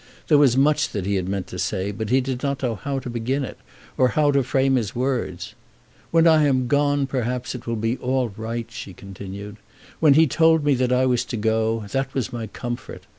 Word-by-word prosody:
There 150 -2 +6
was 130 -4 +4
much 145 +2 +3
that 100 -3 -3
he 100 -1 0
meant 95 0 -3
to 90 0 -8
say, 100 0 -1
but 110 +1 -5
he 130 +2 +3
did 130 -1 -4
not 140 -1 -2
know 120 -3 0
how 135 +7 -4
to 130 - -5
begin 120 +4 -2
it, - - -10 0.4
or 130 - +5
how 145 +3 +2
to 140 -1 +3
frame 135 +1 +1
his 110 -5 -1
words. 115 -6 -2 0.6
"When 165 0 +4
I 160 -2 +5
am 130 -2 +2
gone, 145 +2 +2
perhaps, 125 -2 -2
it 125 -2 -9
will 115 - -1
be 115 +3 -1
all 130 -1 0
right," 115 +1 -4
she 100 -4 -8
continued. 100 +2 -9 0.4
"When 150 -3 +5
he 160 +2 +6
told 160 +2 +3
me 145 -1 +3
that 125 -1 0
I 125 +1 +3
was 125 -1 +2
to 120 0 -4
go, 110 0 0
that 135 0 -2
was 130 -3 -2
my 115 -2 -4
comfort. 120 +3 -6
125 Hz, 220 wpm, -23 LUFS, 110-135 Hz, 0.6 s, There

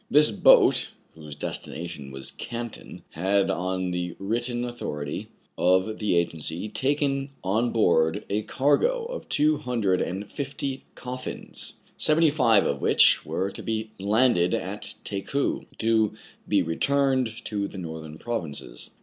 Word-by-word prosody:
This 150 -2 +5
boat, 105 - +5 0.2
whose 75 -2 -10
destination 80 -1 -5
was 65 0 -6
Canton, 120 -1 -7
had, 95 +4 +2
on 95 0 -1
the 90 -1 -3
written 120 +4 -1
authority 75 -12 -4 0.3
of 95 +4 +2
the 105 -4 +1
agency, 85 +3 -1
taken 140 +3 0
on 110 +6 +1
board 90 -3 +2
a 105 +2 0
cargo 145 - +2
of - - -7
two 150 +1 +3
hundred 115 -10 0
and 95 +3 -3
fifty 135 -1 -4
coffins, 125 0 -6 0.2
seventy 155 0 +5
five 115 -9 +4
of 70 - -1
which - - +5
were 95 +1 -1
to - - -8
be 110 -1 -3
landed 100 -3 +3
at - - -3
Takou, 105 +8 -2
to 110 -2 +2 0.3
be - - +3
returned 130 - +1
to 100 -2 -2
the 100 - -10
northern 80 -3 -7
provinces. 90 -11 -5
110 Hz, 130 wpm, -26 LUFS, 90-130 Hz, 0.3 s, This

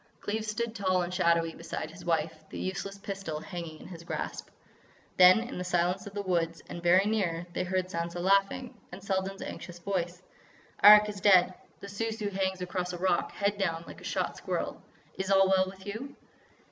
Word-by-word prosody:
Cleves 215 +1 -3
stood 225 +1 -2
tall 185 -4 +1
and 175 +1 -5
shadowy 170 -2 +2
beside 165 -1 -6
his 170 +2 -12
wife, 165 -1 0 0.2
the - - -8
useless 195 +1 -4
pistol 195 -6 -5
hanging 160 -1 -7
in - - -11
his 170 -2 -10
grasp. - - -5 0.7
Then, 185 +4 +8
in 240 -5 -6
the - - -2
silence 180 +2 0
of 200 - -10
the 205 - -2
woods, 170 -3 0
and 170 - -7
very 180 +3 +5
near, 185 -6 0
they - - -1
heard 185 0 0
Sansa 170 -1 -4
laughing. 195 +7 +1 0.2
And 185 +2 -9
Selden's 195 0 -2
anxious 175 -1 -8
voice: 175 0 -3 0.6
"Arrak 210 +1 +10
is 205 -2 -6
dead. 185 -2 +6 0.3
The 200 - -7
Sou 205 +3 -3
Sou 215 -2 -3
hangs 190 -1 -1
across 180 0 -3
a - - -4
rock, 180 0 +1
head 200 0 -1
down, 165 -4 -1
like - - -11
a - - -13
shot - - -2
squirrel. - - -3 0.4
Is 190 0 -2
all 195 -1 +5
well 190 0 +3
with 190 0 -11
you?" 225 +7 -6
190 Hz, 195 wpm, -29 LUFS, 175-200 Hz, 0.7 s, Arrak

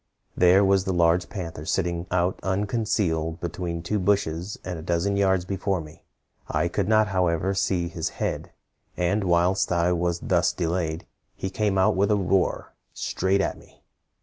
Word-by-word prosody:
There 90 +3 +5
was 95 -1 +3
the 95 - 0
large 85 0 +3
panther 85 -7 -6
sitting 85 +1 -1
out 90 0 0
unconcealed 95 -5 -1
between 85 -1 -4
two 105 +5 -1
bushes 95 -1 0
a 90 -3 -4
dozen 85 +4 0
yards 95 -2 +2
before 95 0 -1
me. 75 -1 -11 0.5
I 80 +3 0
could 95 +1 -1
not, 110 -1 +3
however, 90 0 +1
see 95 -2 0
his 85 -1 -3
head; - - -3 0.5
and 95 +4 +1
whilst 90 +2 +2
I 85 0 +2
was 85 -1 0
thus - - +1
delayed, 85 -1 -2 0.3
he 95 - -4
came 105 -1 0
out 95 - +3
with 100 +3 +2
a 105 - +4
roar, 95 -1 0 0.2
straight 95 +2 0
at - - -2
me. - - -21
90 Hz, 160 wpm, -25 LUFS, 85-95 Hz, 0.5 s, There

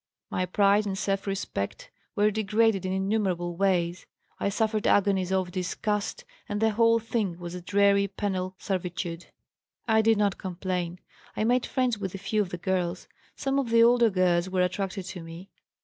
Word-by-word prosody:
My 185 - -1
pride 205 +2 +3
and 195 -1 -2
self 195 0 -1
respect 190 - -4 0.2
were 210 +1 +3
degraded 215 -1 +1
in - - -2
innumerable 190 -3 -1
ways, 180 -2 0 0.3
I - - 0
suffered 215 +1 0
agonies 190 -2 +2
of 185 -2 0
disgust, 200 +3 -2 0.2
and 205 0 -2
the 220 0 +3
whole 230 +1 +4
thing 215 -6 -2
was 175 -1 -7
a 180 - -6
dreary 200 +1 +3
penal 190 -2 -3
servitude. 180 -3 -4 0.6
"I 220 -1 +4
did 225 0 +3
not 205 -2 +1
complain. 180 -1 -3 0.4
I - - +1
made 245 +2 +2
friends 250 -4 0
with 195 -2 -4
a - - -3
few 210 +2 0
of 195 - -2
the 180 - -5
girls. 180 0 -2 0.3
Some 275 0 0
of 260 -4 -2
the 230 0 +6
older 235 -1 +5
girls 185 -2 +2
were 185 -1 +1
attracted 190 +1 -2
to 180 -1 -7
me. 165 +3 -10
195 Hz, 175 wpm, -27 LUFS, 180-210 Hz, 0.6 s, the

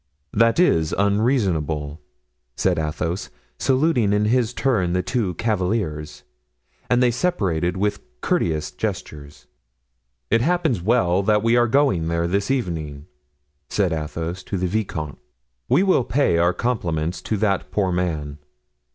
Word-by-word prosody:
"That 115 +6 +3
is 80 - +3
unreasonable," 95 - 0 0.5
said 90 -3 +1
Athos, 80 +3 -3 0.3
saluting 130 -6 +2
in 105 +1 +2
his 120 +1 +2
turn 110 -10 0
the 90 0 0
two 95 -2 -1
cavaliers. 90 -7 -2 0.7
And 125 0 +3
they 125 - +4
separated 95 - 0
with 105 +2 0 0.2
courteous 80 +1 0
gestures. 75 -1 -6 0.9
"It 115 - +4
happens 160 - +1
well 100 -3 +2
that 105 +1 +2
we 115 +1 +3
are 120 0 +4
going 120 - +2
there 85 0 0
this 100 +3 -1
evening," 80 - -2 0.6
said 95 -5 +1
Athos 80 +3 -4
to 100 - -3
the 90 - -1
vicomte; 85 - -3 0.5
"we 185 - +4
will 185 -9 +3
pay 130 -10 +1
our 85 +1 +4
compliments 90 -8 -2
to 110 - -2
that 100 -2 0
poor 95 -3 0
man." 80 -5 -2
95 Hz, 135 wpm, -22 LUFS, 80-115 Hz, 0.9 s, they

